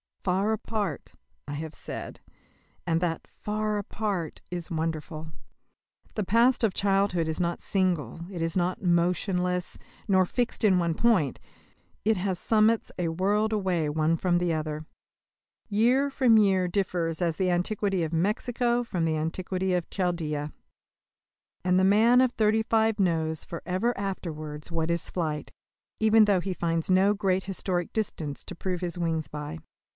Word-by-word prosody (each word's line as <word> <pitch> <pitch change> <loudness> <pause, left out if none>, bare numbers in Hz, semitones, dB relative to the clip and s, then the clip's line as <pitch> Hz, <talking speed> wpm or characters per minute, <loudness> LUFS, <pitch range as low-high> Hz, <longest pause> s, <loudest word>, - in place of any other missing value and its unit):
"Far 190 +3 +1
apart," 220 -2 -3 0.3
I 145 - -5
have 155 +1 -5
said, - - -7 0.7
and 165 0 +1
that 170 -2 -1
"far 215 0 -2
apart" 200 -5 -3
is 175 -2 -4
wonderful. 160 -1 -3 0.8
The 215 - -1
past 235 +6 +3
of 210 -5 +2
childhood 195 -4 +1
is 160 -1 -2
not 170 -1 -1
single, 180 -5 -1
is 165 -3 -3
not 180 +2 0
motionless, 180 +1 +1 0.3
nor 190 -2 +4
fixed 240 +6 -1
in 195 -4 +5
one 170 -2 +1
point; 190 - +2 0.7
it 220 -1 +3
has 185 0 -1
summits 220 +3 +2
a 170 -2 0
world 205 +6 +1
away 185 -7 0
one 155 +2 +1
from 175 +1 +1
the 175 -1 +1
other. 155 0 -3 0.8
Year 245 +7 +3
from 250 -4 +4
year 190 -3 +3
differs 175 -3 -1
as 170 -2 0
the 185 -1 +1
antiquity 190 +1 0
of 160 0 -3
Mexico 240 +7 +1
from 180 -8 -2
the 160 -1 0
antiquity 185 +4 -2
of 175 -2 -1
Chaldea. 155 -5 -2 1.1
And 180 0 +3
the - - +3
man 225 +6 +5
of 255 -2 +3
thirty 220 0 +2
five 220 -1 +2
knows 160 -4 +1
for 170 - -7
ever 205 +7 0
afterwards 155 -6 -5
what 165 0 0
is 170 -1 -2
flight, 155 -4 -3 0.5
even 220 0 +6
though 200 -3 +3
he 190 +1 -2
finds 165 -1 -1
no 195 +3 +4
great 190 -2 +1
historic 185 -2 -1
distances 160 -9 -2
to 185 - -8
prove 180 0 -3
his 175 -1 -3
wings 160 -3 -1
by. 150 +2 -6
180 Hz, 150 wpm, -27 LUFS, 165-210 Hz, 1.1 s, even